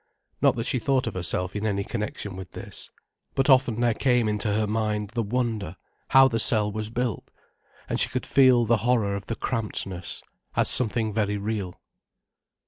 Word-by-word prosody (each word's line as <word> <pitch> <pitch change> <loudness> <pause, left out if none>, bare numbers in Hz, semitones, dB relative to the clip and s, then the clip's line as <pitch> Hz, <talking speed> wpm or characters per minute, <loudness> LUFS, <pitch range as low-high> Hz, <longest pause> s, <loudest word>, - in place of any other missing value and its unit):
Not - - +4
that 115 -1 -3
she 130 - 0
thought 130 +1 +1
of 115 - -4
herself 90 +1 -1
in 105 - -3
any 100 -2 -1
connection 105 -3 -5
with 95 -1 -9
this. - - -8 0.5
But 135 +1 +3
often 125 -3 +3
there 120 -1 +3
came 125 -2 +1
into 105 0 -1
her 105 +1 +1
mind 105 -1 -2
the 120 -1 -1
wonder, 110 -5 -2 0.3
how 135 0 +6
the 115 -3 -1
cell 105 -2 +4
was 110 +1 -3
built, 120 -2 -3 0.6
and - - -2
she - - +3
could - - -3
feel 130 -3 +4
the 115 +1 +3
horror 115 -4 +1
of 100 0 -7
the 115 - -3
crampedness, 95 -8 -4 0.3
as - - +4
something 110 -3 +3
very 105 -1 0
real. 100 -3 -4
110 Hz, 180 wpm, -25 LUFS, 100-120 Hz, 0.6 s, how